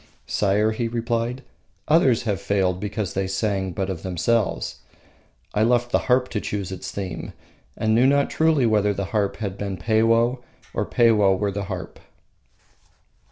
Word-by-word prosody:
"Sire," 105 Hz, +2 st, +1 dB
he 115 Hz, +2 st, -2 dB
replied, 115 Hz, +2 st, -2 dB, 0.4 s
"others 130 Hz, -6 st, +4 dB
have 105 Hz, -4 st, -2 dB
failed 95 Hz, -2 st, 0 dB
because 105 Hz, -1 st, -3 dB
they 95 Hz, 0 st, -1 dB
sang 95 Hz, -1 st, -1 dB
but 95 Hz, +2 st, -2 dB
of 95 Hz, -4 st, -4 dB
themselves. 95 Hz, +4 st, -1 dB, 0.8 s
I 105 Hz, -, +1 dB
left 120 Hz, +1 st, +2 dB
the -, -, +3 dB
harp 125 Hz, 0 st, +4 dB
to 105 Hz, -, -2 dB
choose 100 Hz, -2 st, -4 dB
its 95 Hz, -, -6 dB
theme, 95 Hz, -4 st, -5 dB, 0.4 s
and 110 Hz, 0 st, +1 dB
knew 120 Hz, +4 st, +5 dB
not 140 Hz, +1 st, +2 dB
truly 160 Hz, -5 st, +3 dB
whether 105 Hz, -2 st, +2 dB
the 100 Hz, -, -2 dB
harp 105 Hz, -2 st, +1 dB
had 100 Hz, -3 st, -5 dB
been 100 Hz, -2 st, -3 dB
Peiwoh 115 Hz, +5 st, +2 dB, 0.3 s
or -, -, -1 dB
Peiwoh 105 Hz, -5 st, +4 dB
were 100 Hz, +1 st, -1 dB
the 100 Hz, 0 st, -4 dB
harp." -, -, -6 dB
105 Hz, 160 wpm, -23 LUFS, 95-115 Hz, 0.8 s, knew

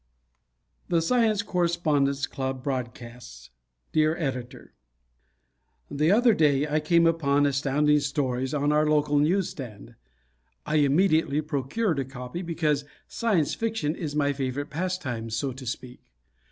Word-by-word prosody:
The 170 Hz, -, +3 dB
Science 215 Hz, +3 st, +2 dB
Correspondence 155 Hz, -7 st, +1 dB
Club 130 Hz, -1 st, -4 dB
Broadcasts 120 Hz, -, -6 dB, 0.4 s
Dear 155 Hz, +1 st, +2 dB
Editor: 130 Hz, -6 st, -5 dB, 1.2 s
The 150 Hz, +3 st, +1 dB
other 235 Hz, +2 st, +5 dB
day 150 Hz, -4 st, +2 dB
I 150 Hz, +1 st, +1 dB
came 170 Hz, +2 st, +3 dB
upon 145 Hz, -4 st, +2 dB
Astounding 145 Hz, +2 st, +2 dB
Stories 130 Hz, -3 st, -1 dB
on 145 Hz, 0 st, +1 dB
our 150 Hz, 0 st, +3 dB
local 150 Hz, -1 st, +2 dB
newsstand. 145 Hz, -, -2 dB, 0.7 s
I 155 Hz, -, 0 dB
immediately 155 Hz, 0 st, +3 dB
procured 155 Hz, -, -1 dB
a 135 Hz, -, -1 dB
copy 125 Hz, +5 st, -7 dB
because 155 Hz, -4 st, 0 dB, 0.2 s
Science 200 Hz, -10 st, 0 dB
Fiction 225 Hz, -9 st, -2 dB
is 155 Hz, -5 st, -5 dB
my 145 Hz, -1 st, +1 dB
favorite 135 Hz, +2 st, -4 dB
pastime, 150 Hz, -9 st, -3 dB
so 110 Hz, +5 st, -2 dB
to 130 Hz, 0 st, -10 dB
speak. 125 Hz, +1 st, -6 dB
145 Hz, 125 wpm, -26 LUFS, 135-165 Hz, 1.2 s, other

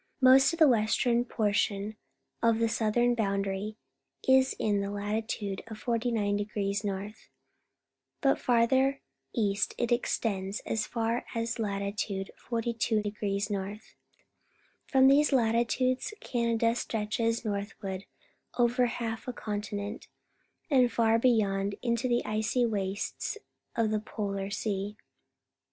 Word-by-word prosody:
Most 265 Hz, +2 st, +7 dB
of 335 Hz, -, -4 dB
the 315 Hz, -2 st, +7 dB
western 235 Hz, +1 st, +2 dB
portion 210 Hz, -2 st, 0 dB, 0.5 s
of 230 Hz, -1 st, +4 dB
the 230 Hz, 0 st, +2 dB
southern 230 Hz, +2 st, +2 dB
boundary 200 Hz, -1 st, -1 dB, 0.5 s
is 265 Hz, 0 st, +5 dB
in 205 Hz, -2 st, +1 dB
latitude 205 Hz, -1 st, -3 dB
49° 210 Hz, -3 st, -1 dB
N.; 200 Hz, +1 st, -3 dB, 1.1 s
but 275 Hz, -2 st, +2 dB
farther 260 Hz, +3 st, +3 dB, 0.4 s
east 205 Hz, -4 st, 0 dB
it 240 Hz, -1 st, -1 dB
extends 200 Hz, -5 st, 0 dB
as 215 Hz, -1 st, -1 dB
far 230 Hz, 0 st, 0 dB
south -, -, -7 dB
as 230 Hz, +1 st, -2 dB
latitude 200 Hz, -1 st, -2 dB, 0.2 s
42° 215 Hz, -3 st, -1 dB
N. 200 Hz, +1 st, -3 dB, 1.1 s
From 265 Hz, -1 st, +5 dB
these 290 Hz, +3 st, +5 dB
latitudes 255 Hz, -, +1 dB
Canada 230 Hz, -1 st, +1 dB
stretches 230 Hz, 0 st, -1 dB
north 200 Hz, -1 st, -3 dB
ward 190 Hz, 0 st, -4 dB, 0.5 s
over 245 Hz, +1 st, +3 dB
half 230 Hz, -1 st, -4 dB
a 250 Hz, -, -3 dB
continent, 205 Hz, 0 st, -4 dB, 0.6 s
and 250 Hz, -3 st, +5 dB
far 225 Hz, -1 st, +3 dB
beyond, 205 Hz, -5 st, +2 dB
mto 235 Hz, +1 st, +1 dB
the 240 Hz, 0 st, +1 dB
icy 220 Hz, +3 st, +1 dB
wastes 205 Hz, -, -2 dB, 0.4 s
of 225 Hz, -2 st, +1 dB
the 215 Hz, -, +1 dB
Polar 200 Hz, -3 st, -4 dB
Sea. 205 Hz, 0 st, -3 dB
220 Hz, 110 wpm, -29 LUFS, 205-240 Hz, 1.1 s, Most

